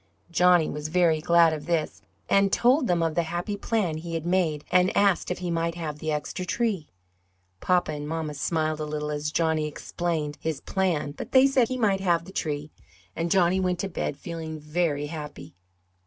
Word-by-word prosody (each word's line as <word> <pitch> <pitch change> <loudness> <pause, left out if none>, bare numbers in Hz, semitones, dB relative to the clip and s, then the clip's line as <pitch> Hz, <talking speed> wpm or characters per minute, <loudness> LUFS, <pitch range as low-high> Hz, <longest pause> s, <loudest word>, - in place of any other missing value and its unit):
Johnny 175 -1 +4
was 150 +1 -4
very 165 -2 +2
glad 170 -1 +5
of 155 +1 -6
this, 165 -3 -1 0.3
and 195 0 +3
told 255 +2 +3
them 175 -1 +2
of 165 -1 0
the 170 - +2
happy 175 +5 -3
plan 200 -6 -1
he 165 +1 -5
had 165 0 -3
made 170 -5 0
and 180 +1 +3
asked 200 -3 +3
if 180 - -2
he 180 -1 -3
might 165 0 -1
have 155 -3 -5
the 155 0 -2
extra 150 +5 -3
tree. 195 -4 -1 0.7
Papa 180 -3 +1
and 145 -1 -5
mamma 160 -1 -3
smiled 155 +1 -1
a 155 - -2
little 150 0 -3
as 150 0 -2
Johnny 160 -1 +1
explained 155 -1 -3
his 160 -3 -2
plan 175 -6 -1
but 145 - -8
they 260 0 +7
said 270 -3 +3
he 255 - -3
might 205 -5 +2
have 170 -3 +1
the 190 - -10
tree, 150 -4 -3 0.4
and 165 +1 -1
Johnny 185 0 +3
went 180 -1 0
to 195 - -2
bed 155 -5 -3
feeling 160 0 -6
very 150 -1 -1
happy. 150 -1 -8
165 Hz, 195 wpm, -26 LUFS, 155-180 Hz, 0.7 s, they